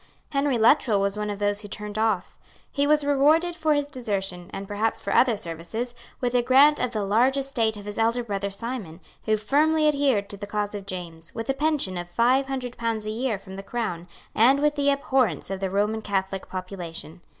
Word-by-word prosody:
Henry 275 -3 +1
Luttrell 225 -2 +4
was 200 0 0
one 210 0 -3
of 205 - -3
those 205 0 0
who 205 - -8
turned 210 0 -6
off. 215 -5 0 0.3
He 285 0 +1
was 300 0 +4
rewarded 300 +5 +3
for 315 -3 +2
his 290 0 +1
desertion, 195 -10 -4
and 195 0 -6
perhaps 210 +2 -1
for 200 - -3
other 240 -4 +4
services, 200 +7 -5 0.3
with 245 -1 -1
a 245 - +4
grant 275 +5 +5
of 250 - 0
the 215 -3 -2
large 235 +7 +3
estate 235 -6 0
of 205 - -10
his 205 +1 -5
elder 230 +2 +2
brother 200 -3 -3
Simon, 200 -5 -5 0.3
who 215 -1 +2
firmly 305 +8 +2
adhered 275 -9 +2
to 200 - -7
the 205 0 -7
cause 205 0 -2
of 200 -1 -7
James, 170 -3 -7
with 225 +4 -1
a - - -1
pension 270 - 0
of 175 0 -7
five 250 +8 +2
hundred 255 -3 -4
pounds 225 -2 -2
a 215 - -2
year 230 -1 -1
from 190 0 -11
the - - -5
Crown, 195 -6 -4 0.3
and 260 +5 +5
with 295 0 +2
the 285 -1 +1
abhorrence 270 -7 +1
of 195 - -3
the 190 -1 -2
Roman 210 +3 0
Catholic 195 -2 -2
population. 180 -3 -7
220 Hz, 210 wpm, -25 LUFS, 200-270 Hz, 0.3 s, grant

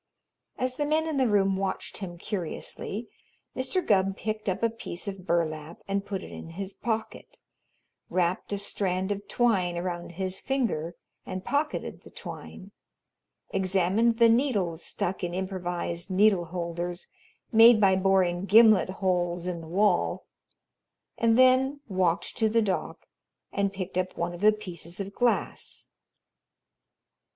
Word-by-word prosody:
As 255 0 -1
the 295 - 0
men 315 +1 +1
in 310 -3 -1
the 260 -2 +3
room 195 -2 +3
watched 195 0 -3
him 175 -4 -6
curiously, 200 +4 -5 0.5
Mr. 260 +8 -1
Gubb 195 -1 +2
picked 215 -1 -3
up 190 - -2
a 230 - +4
piece 210 -5 -7
of 195 -2 -6
burlap 160 -1 -1
and 195 0 -1
put 200 -1 -4
it - - -10
in - - -8
his 195 0 -4
pocket, 225 -2 -4 0.7
wrapped 180 +1 0
a 200 - 0
strand 190 -1 -1
of 200 0 -4
twine 190 -8 +1
around 175 -1 -4
his 190 +1 -3
finger 215 - -1 0.3
and 185 0 -6
pocketed 295 +2 -2
the - - -14
twine, - - -9 0.8
examined 195 +4 +2
the 230 0 +7
needles 215 - +1
stuck 185 +1 -3
in 175 0 -2
improvised 180 -2 -3
needle 190 -1 +4
holders 175 +1 -4 0.4
made 225 0 +8
by 195 -2 +5
boring 190 -1 +2
gimlet 215 -3 +6
holes 180 -2 -1
in 175 -2 -3
the 160 - -10
wall, 200 +5 +1 0.9
and 230 0 +4
then 260 +2 +4
walked 185 -3 0
to 220 -1 +3
the 225 +1 +3
dock 195 -3 -3 0.5
and 200 0 0
picked 185 -2 -3
up 185 0 -3
one 170 +1 -2
of 175 - -9
the 215 +1 +7
pieces 180 -4 -7
of 200 0 -5
glass. 245 +1 -1
195 Hz, 145 wpm, -27 LUFS, 175-220 Hz, 0.9 s, made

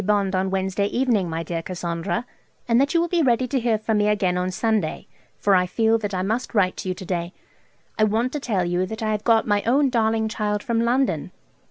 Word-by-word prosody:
Bond 200 -1 +1
on 190 +1 0
Wednesday 190 +1 0
evening, 230 -6 +1
my 165 +1 -3
dear 165 0 -3
Cassandra, 170 +6 -3 0.4
and 235 +1 +4
that 280 - +1
you - - +5
will 340 - +1
be 345 0 +1
ready 255 -2 +2
to 265 +1 0
hear 230 -2 +1
from 215 0 0
me 210 - +2
again 195 -4 +1
on 180 0 -1
Sunday, 210 -3 -1 0.3
for 200 - +2
I 180 -1 +3
feel 225 +4 +2
that 205 -2 -3
I 185 - -1
must 225 +5 -2
write 185 -3 +2
to - - -5
you 185 - -2
to 185 - -9
day. 175 0 -3 0.7
I 215 - +5
want 225 +4 0
to 295 - -2
tell 205 -9 -1
you 175 +1 0
that 220 +2 -6
I 215 - 0
have 210 0 -2
got 225 -1 +3
my 205 -1 +2
own 270 +4 +2
darling 220 -2 +1
child 210 -1 -2
from 230 -1 0
London. 250 +3 +1
210 Hz, 235 wpm, -23 LUFS, 185-230 Hz, 0.7 s, you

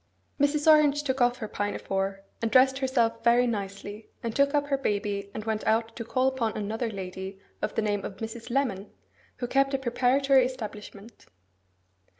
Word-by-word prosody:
Mrs. 290 +1 +2
Orange 300 -2 +5
took 260 -2 -1
off 245 0 +3
her 220 - -5
pinafore, 195 -1 -2 0.2
and 230 - 0
dressed 265 +3 +5
herself 235 -4 +1
very 240 +1 +5
nicely, 205 -1 -5
and 230 -1 -3
took 280 +1 +3
up 290 0 +2
her 275 - +2
baby, 205 -4 -2
and 215 +1 -6
went 220 -1 -1
out 225 +1 +1
to 235 - -5
call 255 +3 +1
upon 245 -5 -1
another 220 +3 -2
lady 190 -1 -6 0.2
of - - -2
the 225 - +1
name 205 -1 -1
of 190 - -6
Mrs. 225 +2 -7
Lemon, 235 -7 -1 0.5
who 245 - -4
kept 275 +2 +2
a - - +2
preparatory 265 +1 +3
establishment. 215 -3 -7
230 Hz, 170 wpm, -27 LUFS, 210-265 Hz, 0.5 s, Orange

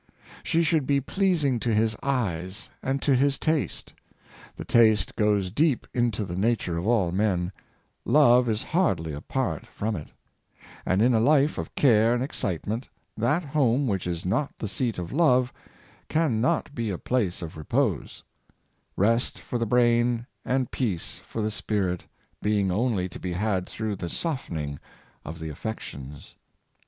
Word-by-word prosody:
''She 165 +1 +2
should 155 -4 +2
be 140 -1 +3
pleasing 150 -4 +1
to 115 - -1
his 110 +1 +2
eyes 100 -7 -2
and 135 +1 -1
to 140 - +3
his 140 +2 +3
taste; 155 -2 -1 0.6
the - - -7
taste 110 -3 +4
goes 105 -3 +1
deep 145 - +2
into 115 -4 0
the 85 - -5
nature 100 -3 0
of 85 +4 -2
all 105 -7 +2
men 95 -2 0 0.3
— - - -41 0.2
love 125 -2 +5
is 110 0 0
hardly 95 - 0
apart 80 - -3
from 110 +1 -3
it; 75 - -6 0.8
and 95 +3 +3
in 125 +1 +4
a 115 - +4
life 145 +4 +3
of - - -6
care 115 -3 +4
and 125 - 0
excite 95 - -2
ment, 115 +5 -3 0.3
that 130 +10 +1
home 140 -2 +2
which 95 -7 -1
is 85 -1 -3
not 135 +10 0
the 110 - -4
seat 115 +3 -1
of 90 -1 -5
love 130 -6 +3 0.6
can 155 -9 +1
not 155 +1 0
be 115 -5 -2
a 95 - -2
place 100 -7 -1
of 80 - -7
repose 75 -2 -1 0.4
— - - -44 0.3
rest 115 +5 +2
for 120 - -4
the 115 - 0
brain, 120 0 +3 0.2
and 130 -1 0
peace 100 -10 -2
for 110 - -3
the 110 - 0
spirit, 100 -4 -2 0.3
being 105 -3 +1
only 105 -2 0
to 85 - -10
be 90 -1 -3
had 95 -1 -1
through 110 -2 -3
the 90 -3 -5
softening 80 - -3 0.4
of 80 +2 -7
the 80 -1 -6
affections. 75 -6 -7
115 Hz, 165 wpm, -26 LUFS, 95-130 Hz, 0.8 s, love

